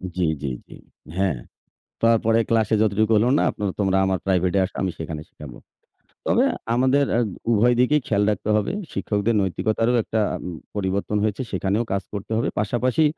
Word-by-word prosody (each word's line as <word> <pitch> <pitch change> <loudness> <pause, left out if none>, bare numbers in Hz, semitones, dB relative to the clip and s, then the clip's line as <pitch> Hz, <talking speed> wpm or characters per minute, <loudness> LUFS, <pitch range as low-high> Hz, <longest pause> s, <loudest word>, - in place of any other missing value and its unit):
জি, 90 - 0 0.2
জি, - - -1 0.2
জি। - - -12 0.4
হ্যাঁ। 95 -9 +1 0.7
তারপরে 115 0 +4
ক্লাসে 110 -1 +2
যতটুকু 110 +1 +2
হলো 120 +4 +3
না - - +2
আপনারা 100 -2 -3
তোমরা 95 -1 +2
আমার 95 -2 0
প্রাইভেট 90 -1 +1
এ - - +5
আসো - - -10
আমি 95 -2 0
সেখানে 80 -1 -5
শিখাবো। 70 -5 -11 0.7
তবে - - +3 0.3
আমাদের 130 +3 +3
আ - - +2 0.3
উভয় 120 +2 +4
দিকেই 150 +4 +3
খেয়াল 105 -1 +1
রাখতে 105 +1 -3
হবে। 105 - 0 0.2
শিক্ষকদের 105 +2 0
নৈতিকতারও 110 +5 0
একটা 110 +1 -1 0.3
উ - - -3 0.3
পরিবর্তন 100 +1 -1
হয়েছে, 110 +4 -1
সেখানেও 95 +5 0
কাজ 100 -1 0
করতে 105 +2 -5
হবে। 115 - 0
পাশাপাশি 125 +8 +1
105 Hz, 170 wpm, -23 LUFS, 95-115 Hz, 0.7 s, এ